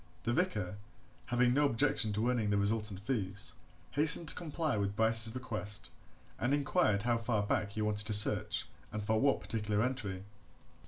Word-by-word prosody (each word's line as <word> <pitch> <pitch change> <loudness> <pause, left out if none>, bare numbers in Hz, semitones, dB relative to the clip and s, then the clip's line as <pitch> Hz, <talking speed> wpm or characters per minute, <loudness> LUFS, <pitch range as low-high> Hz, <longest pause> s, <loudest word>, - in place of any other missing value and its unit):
The 120 - -1
vicar, 105 - -1 0.5
having 120 0 +2
no 145 +2 +3
objection 115 -2 +1
to 110 +4 0
earning 115 -4 -1
the 100 - +1
resultant 105 -1 -2
fees, 100 -7 -2 0.4
hastened 150 +3 +5
to - - -5
comply 160 -4 -3
with 100 -1 -2
Bryce's 110 +1 +3
request, 105 -4 -4 0.5
and 130 +4 +1
inquired 140 - +1
how 120 -1 0
far 115 -3 -1
back 100 0 -2
he 110 - -3
wanted 105 0 -1
to 110 - +1
search 105 0 +4 0.3
and 105 0 -5
for 110 +1 0
what 140 0 +2
particular 105 -1 -2
entry. 100 -8 -4
110 Hz, 165 wpm, -32 LUFS, 105-125 Hz, 0.5 s, hastened